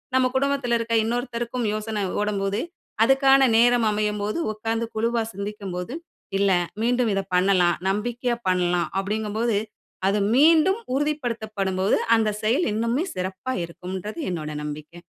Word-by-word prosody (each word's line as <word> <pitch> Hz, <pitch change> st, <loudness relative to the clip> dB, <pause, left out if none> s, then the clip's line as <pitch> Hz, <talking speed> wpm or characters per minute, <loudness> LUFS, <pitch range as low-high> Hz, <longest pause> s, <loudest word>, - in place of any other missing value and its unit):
நம்ம 260 Hz, 0 st, +4 dB
குடும்பத்துல 275 Hz, -3 st, +1 dB
இருக்கிற 230 Hz, 0 st, 0 dB
இன்னொருத்தருக்கும் 240 Hz, 0 st, -2 dB
யோசனை 215 Hz, -1 st, -3 dB, 0.2 s
ஓடும்போது, 200 Hz, 0 st, -1 dB, 0.4 s
அதுக்கான 270 Hz, 0 st, +5 dB
நேரம் 240 Hz, -1 st, +4 dB
அமையும்போது 210 Hz, +2 st, -1 dB, 0.2 s
உட்கார்ந்து 225 Hz, +2 st, -2 dB
குழுவா 230 Hz, +1 st, +1 dB
சிந்திக்கும்போது, 200 Hz, +1 st, -5 dB, 0.5 s
இல்ல 200 Hz, -1 st, +3 dB, 0.3 s
மீண்டும் 245 Hz, 0 st, +2 dB
இத 195 Hz, -, +1 dB
பண்ணலாம், 180 Hz, -2 st, +3 dB
நம்பிக்கையா 240 Hz, +3 st, -2 dB
பண்ணலாம், 175 Hz, -1 st, +1 dB
அப்படிங்கும்போது 215 Hz, +2 st, -1 dB, 0.5 s
அது 200 Hz, +2 st, +2 dB, 0.2 s
மீண்டும் 325 Hz, -, +5 dB
உறுதிப்படுத்தப்படும்போது 220 Hz, -9 st, -1 dB, 0.2 s
அந்த 220 Hz, -1 st, +2 dB
செயல் 240 Hz, +11 st, +2 dB
இன்னுமே 230 Hz, +7 st, 0 dB
சிறப்பாக 190 Hz, +7 st, -3 dB
இருக்கும்ன்றது 185 Hz, -, -7 dB
என்னோட 155 Hz, -4 st, -4 dB
நம்பிக்க. 150 Hz, +3 st, -8 dB
220 Hz, 115 wpm, -24 LUFS, 195-245 Hz, 0.5 s, அதுக்கான